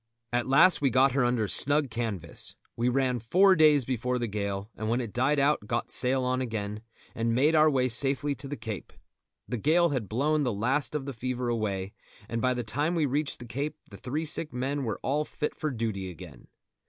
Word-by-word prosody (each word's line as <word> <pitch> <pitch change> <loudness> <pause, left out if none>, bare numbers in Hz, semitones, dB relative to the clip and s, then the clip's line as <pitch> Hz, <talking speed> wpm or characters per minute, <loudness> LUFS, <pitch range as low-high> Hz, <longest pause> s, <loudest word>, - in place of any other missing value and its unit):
At 120 0 0
last 160 +7 +5
we 140 - +3
got 130 +2 +4
her 135 0 +1
under 120 -3 +1
snug 145 +3 +1
canvas. 105 -8 -4 0.2
We 120 +1 +1
ran 125 -1 +1
four 185 - +5
days 150 -5 +5
before 125 0 -1
the 120 - -1
gale, 100 -1 -3
and 110 0 -3
when 120 +2 +1
it 115 -5 -5
died 135 +4 +2
out 140 -6 +2
got 115 +1 -2
sail 130 +1 +1
on 130 0 0
again, 105 -3 -4 0.3
and 115 0 0
made 145 +6 +3
our 155 0 +6
way 130 -3 +2
safely 135 +4 +1
to 140 - -8
the 145 +1 -5
Cape. 110 -3 -7 0.5
The 125 - -3
gale 165 +8 +3
had 125 -9 -2
blown 150 +7 +1
the 125 -4 +1
last 130 +9 0
of 145 -3 -2
the 140 - -5
fever 125 +1 -3
away, 100 -4 -2 0.3
and 115 0 -3
by 130 0 +2
the 120 - -2
time 145 +10 -1
we 160 -3 +2
reached 145 +2 -1
the 120 - -10
Cape 145 +5 -4
the 100 - -9
three 150 +9 -3
sick 155 0 0
men 135 +2 -2
were 110 - -3
all 145 +3 +1
fit 150 0 -4
for 155 - -3
duty 110 -7 -3
again. 85 - -12
125 Hz, 215 wpm, -28 LUFS, 115-145 Hz, 0.5 s, our